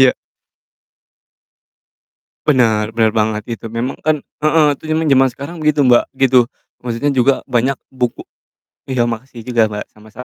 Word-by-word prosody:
Iya. 130 -1 +6 2.3
Bener 110 -6 +2
bener 110 -1 +1
banget 110 -1 0
itu, 115 0 -9
memang 120 +3 -3
kan 155 -1 +1 0.2
heeh, 155 0 +4
itu - - -31
emang 160 0 +1
jaman 135 -2 +4
sekarang 155 +6 -8
begitu, 150 -1 +2
Mbak, 120 -1 +5 0.2
gitu, 125 -1 +5 0.4
Maksudnya 125 +4 -1
juga 130 +2 +3
banyak 130 +1 0
buku 125 -3 -3 0.6
iya, 125 -3 +1
makasih 120 0 -6
juga, 115 -3 +2
Mbak, 105 0 -5
sama-sam 110 +4 -12
125 Hz, 140 wpm, -17 LUFS, 115-140 Hz, 2.3 s, Iya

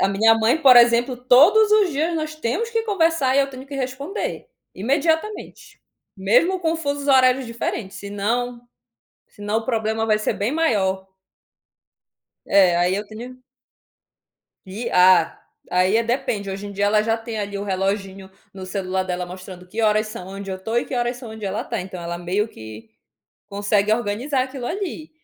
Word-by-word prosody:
a 195 - +3
minha 220 +3 +4
mãe, 225 +7 +2
por 265 -5 +7
exemplo, 240 +1 +5
todos 300 - +5
os 420 -4 +4
dias 315 +4 -1
nós 310 -1 -3
temos 310 - -2
que 455 -1 0
conversar 330 -10 +1
e 280 - +6
eu 275 - 0
tenho 260 0 -10
que 280 - -9
responder 275 - -4 0.3
imediatamente. 320 - -2 0.4
Mesmo 245 - +2
com 330 -1 0
fusos 285 -2 -3
horários 260 -1 +4
diferentes, 230 -3 -4
senão 230 +5 -2 0.7
senão 205 +1 -3
o 225 - -7
problema 225 -2 -1
vai 215 -1 +2
ser 215 - -1
bem 210 +6 -2
maior. 195 -12 0 1.4
É, 185 -3 +4
aí 180 +2 +2
eu 205 +1 -4
tenho 240 +4 -10 1.3
que 205 +6 -5
ah, 180 -2 +5 0.3
aí, 185 +3 +2
eh, 230 - +1
depende, 235 -4 -2
hoje 195 +1 -6
em - - -8
dia 200 +1 -1
ela 210 +1 +3
já 225 +1 0
tem 225 -1 -6
ali 200 -1 -4
o 200 - -4
reloginho 195 0 -3 0.2
no 190 -1 -8
celular 185 0 -2
dela 180 -1 -3
mostrando 180 0 -10
que 215 +5 -4
horas 215 0 +2
são 215 -4 -8
onde 195 0 -7
eu 185 - -5
tô 225 +4 -4
e 240 - 0
que - - -5
horas 240 0 -1
são 245 -2 -9
onde 220 -1 -7
ela 195 +2 -3
tá, - - -4
então 185 -1 -7
ela 170 0 -4
meio 185 +5 -1
que 110 - -11 0.6
consegue 205 +1 +1
organizar 240 +5 -1
aquilo 260 -2 -7
ali. 345 -3 -5
225 Hz, 175 wpm, -22 LUFS, 195-265 Hz, 1.4 s, por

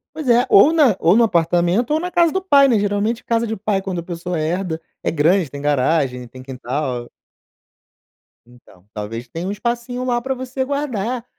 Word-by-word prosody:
Pois 310 -5 -4
é, 240 +1 +4
ou 255 +6 +6
na 295 - +4
ou 170 +4 +4
no 235 - +5
apartamento 175 +2 +1
ou 310 - +2
na 360 +2 -4
casa 340 -2 +3
do 380 - 0
pai, 285 -7 +4
né. 240 -4 +3
Geralmente 205 +3 -1
casa 230 0 0
de 220 0 -4
pai 200 -1 -1
quando 190 -2 -4
a - - -6
pessoa 175 0 -4
herda 165 +1 -2 0.2
é - - -1
grande, 165 +2 +2
tem 140 - -8
garagem, 135 -3 0
tem 130 +2 -13
quintal. 130 -1 -4 1.4
Então, 120 -6 -21
talvez 115 +3 -6
tenha 165 +9 -6
um - - -2
espacinho 240 +4 -3
lá 245 -1 0
pra 265 +2 -2
você 260 +1 -4
guardar 255 -4 -3
195 Hz, 190 wpm, -19 LUFS, 155-245 Hz, 1.4 s, ou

